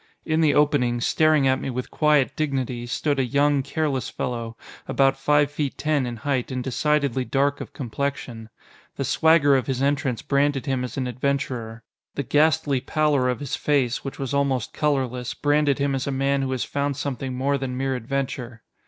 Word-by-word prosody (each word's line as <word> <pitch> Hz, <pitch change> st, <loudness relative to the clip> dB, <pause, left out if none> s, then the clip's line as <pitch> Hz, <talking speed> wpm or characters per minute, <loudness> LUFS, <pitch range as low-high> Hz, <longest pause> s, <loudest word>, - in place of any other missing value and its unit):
In 160 Hz, 0 st, +1 dB
the 155 Hz, -2 st, +3 dB
opening, 140 Hz, -5 st, +2 dB
staring 155 Hz, +2 st, +3 dB
at 130 Hz, 0 st, +2 dB
me -, -, -3 dB
with 125 Hz, 0 st, -4 dB
quiet 150 Hz, -3 st, +2 dB
dignity, 130 Hz, -5 st, -2 dB
stood 140 Hz, +3 st, -1 dB
a -, -, +3 dB
young, 140 Hz, +2 st, +2 dB
careless 140 Hz, -2 st, -2 dB
fellow, 115 Hz, -2 st, -4 dB, 0.3 s
about 135 Hz, -1 st, +3 dB
five 145 Hz, +1 st, +2 dB
feet 145 Hz, -2 st, -3 dB
ten 150 Hz, -3 st, 0 dB
in 120 Hz, -, -4 dB
height 130 Hz, +2 st, -2 dB
and 130 Hz, -1 st, -3 dB
decidedly 140 Hz, -1 st, 0 dB
dark 140 Hz, +2 st, 0 dB
of -, -, -7 dB
complexion. 120 Hz, -2 st, -4 dB, 0.5 s
The -, -, -2 dB
swagger 160 Hz, -3 st, +4 dB
of 130 Hz, -4 st, 0 dB
his 130 Hz, -2 st, -1 dB
entrance 140 Hz, -3 st, 0 dB
branded 140 Hz, -1 st, +1 dB
him 130 Hz, -3 st, -1 dB
as 125 Hz, -, -6 dB
an 130 Hz, -, -1 dB
adventurer. 125 Hz, -3 st, -3 dB, 0.3 s
The 140 Hz, -, -2 dB
ghastly 145 Hz, -1 st, +2 dB
pallor 150 Hz, -4 st, +1 dB
of 125 Hz, +2 st, -2 dB
his 140 Hz, -, -3 dB
face, 135 Hz, -5 st, 0 dB
which 135 Hz, -, -6 dB
was 135 Hz, 0 st, -4 dB
almost 140 Hz, -4 st, 0 dB
colorless, 130 Hz, -5 st, -1 dB
branded 145 Hz, -1 st, +2 dB
him 140 Hz, 0 st, 0 dB
as 135 Hz, 0 st, -2 dB
a -, -, 0 dB
man 135 Hz, +1 st, +1 dB
who 135 Hz, -1 st, -2 dB
has 130 Hz, -2 st, -1 dB
found 140 Hz, -1 st, -2 dB
something 135 Hz, -2 st, -3 dB
more 140 Hz, +2 st, 0 dB
than 130 Hz, -1 st, -4 dB
mere 135 Hz, 0 st, -1 dB
adventure. 125 Hz, -2 st, -4 dB
135 Hz, 185 wpm, -24 LUFS, 125-145 Hz, 0.5 s, swagger